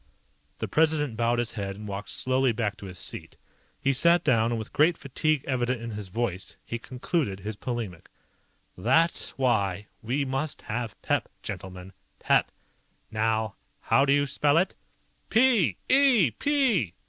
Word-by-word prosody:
The - - -3
President 155 -5 +1
bowed 120 +1 +1
his 120 -1 -1
head 100 -3 -4
and 105 +1 -9
walked 100 0 -5
slowly 130 0 +2
back 110 -2 -2
to 100 - -9
his 90 -1 -9
seat. - - -6 0.4
He 140 - +1
sat 170 +5 +4
down, 115 -6 +3
and 120 - 0
with 110 - -7
great 160 +3 +4
fatigue 145 +1 0
evident 125 -2 0
in 115 0 -6
his 105 -2 -6
voice, 95 -2 -3
he 115 - -4
concluded 125 - -2
his 105 +2 -5
polemic. 110 -7 -5 0.7
"That's 135 - +1
why 105 -7 +1 0.2
we 130 +6 -1
must 135 +3 -3
have 115 0 -4
pep, - - 0
gentlemen. 95 0 -7 0.2
Pep. - - +2 0.6
Now 110 0 0 0.2
how 135 - +3
do 140 - +2
you 145 0 +4
spell 145 +2 +2
it?" 180 +3 +2 0.6
"P! 235 -4 +4
E! 255 - +5
120 Hz, 150 wpm, -27 LUFS, 105-145 Hz, 0.7 s, E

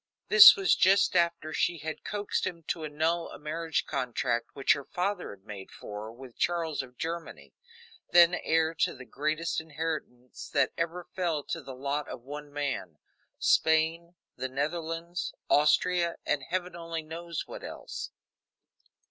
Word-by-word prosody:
This 440 -2 +11
was 390 -2 +3
just 190 0 +4
after 170 -2 +1
she 175 - +1
had 160 +1 -6
coaxed 205 -2 -2
him 170 -2 -6
to 165 - -2
annul 160 +3 -1
a - - -9
marriage 160 +2 -2
contract 125 -3 -2
which 135 - +4
her 140 - -5
father 180 +5 -2
had 100 0 -12
made 100 -3 -8
for 105 +1 -8
her 110 - -8
with 125 +1 -13
Charles 165 -4 0
of 125 -2 -13
Germany, 165 +1 -6 0.6
then 175 0 +7
heir 165 -2 +1
to - - +2
the 130 0 -11
greatest 155 +5 -1
inheritance 155 -5 -5
that 140 -3 +2
ever 170 +1 -2
fell 170 -6 -1
to - - -4
the 135 -1 -9
lot 140 +2 -2
of 120 - -8
one 145 +2 -8
man 140 - -3 0.4
Spain, 160 +2 +2 0.2
the 130 - -4
Netherlands, 165 +5 -3 0.2
Austria, 170 +4 +3
and 145 -3 0
heaven 180 0 -2
only 165 -1 -5
knows 165 +1 -5
what - - -9
else. - - -6
160 Hz, 155 wpm, -29 LUFS, 140-170 Hz, 0.6 s, This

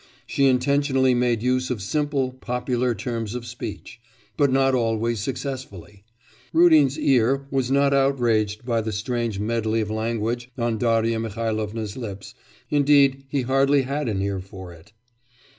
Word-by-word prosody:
She 140 -1 +2
intentionally 135 0 +2
made 120 -2 +1
use 130 0 0
of 125 -4 -2
simple 140 +5 -1
popular 125 -1 -2
terms 115 0 -4
of 120 -1 -5
speech; 120 0 -8 0.3
but 140 -3 +2
not 135 0 +3
always 115 -2 0
successfully. 105 - -6 0.5
Rudin's 155 -5 +5
ear 135 +1 +2
was 135 -2 0
not 140 +1 +3
outraged 120 -6 +1
by 115 -2 0
the 110 0 -4
strange 115 +1 -2
medley 110 +1 -1
of 110 -1 -2
language 115 +2 -2
on 115 -2 -1
Darya 115 -1 +1
Mihailovna's 110 -1 -3
lips, 100 -5 -7 0.4
indeed 140 -2 +4
he 140 -2 -1
hardly 135 +2 +3
had 140 0 -2
an 95 -2 -1
ear 100 -1 -2
for 95 -1 -10
it. 85 +6 -18
120 Hz, 140 wpm, -23 LUFS, 110-135 Hz, 0.5 s, Rudin's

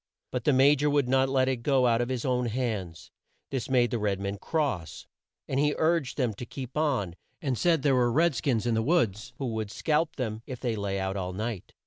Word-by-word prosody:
But 125 - -3
the 150 - +5
Ma 135 +2 +6
jor 150 +1 +1
would 145 -3 +2
not 130 +1 +3
let 130 -1 +2
it 130 -1 +1
go 130 +1 +2
out 115 -1 +3
of 120 - -2
his 130 -3 -2
own 125 -2 +1
hands. 105 -9 -3 0.4
This 130 -4 -3
made 120 -3 +3
the 120 - -1
red 100 -2 0
man 100 0 -4
cross, 140 - -2 0.4
and 135 - -1
he 150 +1 +2
urged 160 -5 +1
them 125 -6 +1
to - - -4
keep 130 -1 -7
on 130 - 0 0.2
and 135 -4 -1
said 165 +2 +2
there 140 - +4
were 125 -2 +3
red 165 +5 +3
skins 125 -4 0
in 120 - +1
the 110 - +2
woods 115 - 0
who 135 - -3
would 110 -2 -3
scalp 155 +7 0
them 110 -4 -3
if 130 -2 -6
they 120 -3 -1
lay 100 -2 -2
out 95 +1 -2
all 90 -1 -3
night. 110 0 -5
125 Hz, 235 wpm, -28 LUFS, 110-140 Hz, 0.4 s, Ma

